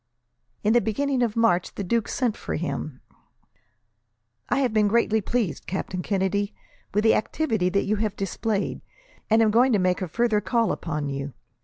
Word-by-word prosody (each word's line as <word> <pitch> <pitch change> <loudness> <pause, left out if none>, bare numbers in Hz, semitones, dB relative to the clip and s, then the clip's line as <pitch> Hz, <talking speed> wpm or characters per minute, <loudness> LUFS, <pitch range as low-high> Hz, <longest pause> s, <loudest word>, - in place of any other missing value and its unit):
In 215 - +3
the 240 - +5
beginning 260 +4 0
of 230 -3 0
March, 180 -6 +2
the 200 - -3
duke 230 +4 0
sent 240 -5 0
for - - -4
him. 155 -4 -4 1.5
"I - - +2
have 250 -5 +1
been 215 -1 +3
greatly 220 0 +2
pleased, 205 - -2
Captain 185 0 -3
Kennedy, 200 +1 -1 0.4
with 210 +2 +1
the 220 - +5
activity 220 - 0
that 200 +2 +1
you 215 +1 0
have 210 -1 -1
displayed, 200 +2 -2 0.5
and 225 +1 +5
am 215 - +3
going 245 +4 +4
to - - +4
make 185 0 +1
a 185 - -2
further 220 +3 +1
call 230 -1 +1
upon 150 -4 -3
you. 140 0 -4
210 Hz, 175 wpm, -25 LUFS, 185-230 Hz, 1.5 s, the